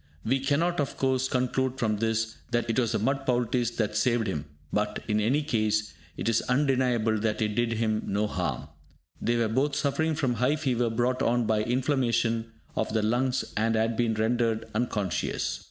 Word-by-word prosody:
We 130 +4 +2
cannot, 155 +6 +1
of 145 - -2
course, 130 -1 +1
conclude 130 +1 0
from 110 -3 0
this 115 0 -1
that 120 -1 0
it 115 +1 +1
was 120 -2 +1
the - - +2
mud 135 +6 0
poultice 120 -1 +1
that 105 -2 -1
saved 115 +1 +2
him, 80 -8 -3 0.3
but, 105 0 -1
in 105 -1 +1
any 130 +8 +2
case, 110 -6 0 0.2
it - - -3
is 115 0 +3
undeniable 125 -5 +2
that 105 0 -1
it 110 -1 +1
did 115 +2 0
him 110 -1 0
no 105 +2 +1
harm. 75 -7 -3 0.5
They 120 0 +1
were 115 -1 +2
both 135 +6 +1
suffering 160 +3 0
from 135 -5 0
high 125 +5 +2
fever 125 -6 0
brought 125 +3 0
on 120 0 +2
by 110 -1 +2
inflammation 120 -2 0 0.2
of 110 - -1
the 110 -1 +1
lungs, 125 +4 +1
and 115 +1 +1
had 110 +1 +1
been 115 -1 +1
rendered 115 0 +1
unconscious. 105 -4 -1
115 Hz, 185 wpm, -27 LUFS, 110-130 Hz, 0.5 s, is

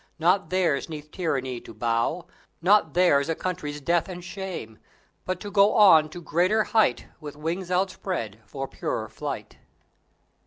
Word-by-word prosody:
Not 180 +4 +2
theirs 175 -6 +1
'neath 150 -1 -8
tyranny 130 -9 -2
to - - -12
bow; 120 +9 0 0.3
Not 180 -3 +3
theirs 165 -5 +4
a 165 - +1
country's 155 -6 -4
death 170 +5 +1
and 180 -1 -7
shame; 180 - -7 0.5
But 185 - -2
to 205 - -6
go 200 0 +4
on 165 -8 +7
to 175 +3 -9
greater 180 +8 +2
height 215 - +2
With 150 -3 -8
wings 170 +4 -4
outspread 180 - -2
for 135 -1 -5
purer - - -4
flight. - - -6
170 Hz, 150 wpm, -25 LUFS, 145-185 Hz, 0.5 s, on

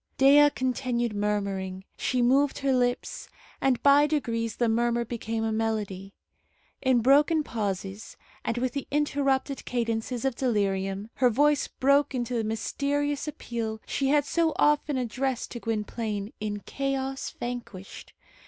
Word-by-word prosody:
Dea 285 +2 +7
continued 250 -3 -1
murmuring. 200 -2 -2
She 250 -1 0
moved 270 +3 +3
her 275 -1 +1
lips, 245 0 -1 0.3
and 260 -3 +1
by 285 +1 +6
degrees 230 -7 -1
the 240 - +1
murmur 235 +1 +1
became 225 -1 -3
a 225 - 0
melody. 210 -3 -2 0.7
In 260 -3 +3
broken 295 +5 +4
pauses, 200 -3 -4 0.3
and 230 - -2
with 250 +1 0
the 280 - -4
interrupted 280 -2 0
cadences 235 +1 -2
of 270 - +1
delirium, 200 -4 -1
her 250 -1 +4
voice 290 +5 +3
broke 280 +1 +2
into 245 0 -2
the 230 -2 0
mysterious 280 +7 -1
appeal 230 -7 -4
she 275 - -1
had 290 +1 +3
so 325 +1 +1
often 295 -1 +2
addressed 255 +1 -2
to 240 - -5
Gwynplaine 215 -2 -3
in 205 -1 -3
Chaos 270 +1 -3
Vanquished. 240 -6 -7
245 Hz, 135 wpm, -27 LUFS, 220-275 Hz, 0.7 s, Dea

